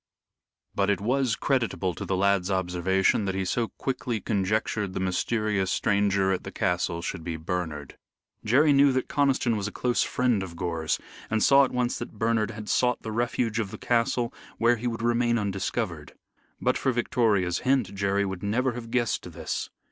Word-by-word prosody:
But 100 Hz, 0 st, +1 dB
it 100 Hz, -, +2 dB
was 125 Hz, +2 st, +1 dB
creditable 115 Hz, -9 st, 0 dB
to -, -, -6 dB
the 95 Hz, -, -1 dB
lad's 100 Hz, -1 st, +2 dB
observation 95 Hz, +2 st, +1 dB
that 95 Hz, -1 st, -2 dB
he 95 Hz, 0 st, -1 dB
so 115 Hz, +5 st, 0 dB
quickly 125 Hz, -3 st, -3 dB
conjectured 105 Hz, 0 st, -1 dB
the -, -, -1 dB
mysterious 95 Hz, +1 st, 0 dB
stranger 100 Hz, -1 st, +2 dB
at 95 Hz, -, -1 dB
the -, -, -7 dB
castle 85 Hz, -1 st, -1 dB
should 90 Hz, -2 st, -4 dB
be 85 Hz, -1 st, -4 dB
Bernard. 80 Hz, -4 st, -4 dB, 0.4 s
Jerry 140 Hz, +7 st, +4 dB
knew 140 Hz, 0 st, +6 dB
that 130 Hz, -1 st, -1 dB
Conniston 135 Hz, -4 st, +2 dB
was 105 Hz, -1 st, -2 dB
a -, -, -5 dB
close 125 Hz, -1 st, 0 dB
friend 125 Hz, -5 st, +1 dB
of 90 Hz, -3 st, -6 dB
Gore's, 80 Hz, -2 st, -1 dB, 0.3 s
and 110 Hz, -1 st, +1 dB
saw 140 Hz, 0 st, +6 dB
at -, -, -6 dB
once 125 Hz, -1 st, -1 dB
that 120 Hz, -2 st, -7 dB
Bernard 110 Hz, -1 st, +1 dB
had 105 Hz, -1 st, -8 dB
sought 125 Hz, +1 st, +1 dB
the 110 Hz, -, -4 dB
refuge 115 Hz, 0 st, 0 dB
of 105 Hz, -4 st, -1 dB
the -, -, -8 dB
castle 120 Hz, 0 st, 0 dB, 0.2 s
where 120 Hz, +1 st, +3 dB
he 120 Hz, +2 st, -3 dB
would 115 Hz, -1 st, -3 dB
remain 120 Hz, 0 st, +2 dB
undiscovered. 100 Hz, -3 st, -3 dB, 0.5 s
But -, -, +1 dB
for 130 Hz, -, +1 dB
Victoria's 105 Hz, -7 st, +1 dB
hint 130 Hz, -7 st, +1 dB
Jerry 100 Hz, 0 st, 0 dB
would 95 Hz, -2 st, -5 dB
never 120 Hz, +6 st, +1 dB
have 115 Hz, -1 st, -7 dB
guessed 120 Hz, -2 st, -1 dB
this. -, -, -4 dB
105 Hz, 180 wpm, -26 LUFS, 95-120 Hz, 0.5 s, knew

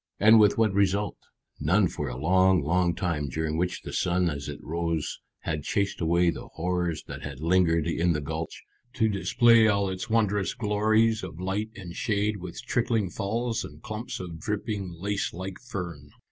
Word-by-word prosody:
And 110 Hz, +2 st, +7 dB
with 105 Hz, -1 st, +5 dB
what 110 Hz, -3 st, +3 dB
result? 100 Hz, +1 st, +1 dB, 0.4 s
None 95 Hz, +5 st, +3 dB
for 75 Hz, -3 st, -4 dB
a 60 Hz, -, -6 dB
long, 95 Hz, +3 st, +4 dB
long 85 Hz, +2 st, +2 dB
time, 80 Hz, -6 st, -1 dB
during 80 Hz, +3 st, -2 dB
which 90 Hz, +2 st, -1 dB
the -, -, -7 dB
sun 90 Hz, -1 st, +1 dB
as 70 Hz, 0 st, -5 dB
it 75 Hz, -, -5 dB
rose 85 Hz, -2 st, -2 dB, 0.2 s
had 75 Hz, -1 st, -2 dB
chased 100 Hz, +7 st, -1 dB
away 85 Hz, +1 st, +3 dB
the -, -, -8 dB
horrors 85 Hz, -2 st, -1 dB
that -, -, -8 dB
had 70 Hz, -2 st, -7 dB
lingered 85 Hz, 0 st, +3 dB
in 85 Hz, +1 st, +1 dB
the 75 Hz, -, -1 dB
gulch, 80 Hz, +3 st, -5 dB, 0.3 s
to 115 Hz, -4 st, +2 dB
display 115 Hz, +2 st, +4 dB
all 100 Hz, -2 st, +2 dB
its 95 Hz, +3 st, -5 dB
wondrous 105 Hz, -3 st, +1 dB
glories 110 Hz, 0 st, +2 dB
of 90 Hz, -3 st, -8 dB
light 95 Hz, +4 st, -2 dB
and 90 Hz, -5 st, -8 dB
shade 105 Hz, -1 st, 0 dB
with 90 Hz, +3 st, -8 dB
trickling 115 Hz, -6 st, 0 dB
falls 115 Hz, +4 st, -2 dB
and 75 Hz, +2 st, -11 dB
clumps 110 Hz, +3 st, -5 dB
of 85 Hz, -3 st, -7 dB
dripping 100 Hz, 0 st, -3 dB
lace 100 Hz, +3 st, -2 dB
like 95 Hz, +1 st, -6 dB
fern. 90 Hz, -, -6 dB
95 Hz, 175 wpm, -27 LUFS, 85-105 Hz, 0.4 s, And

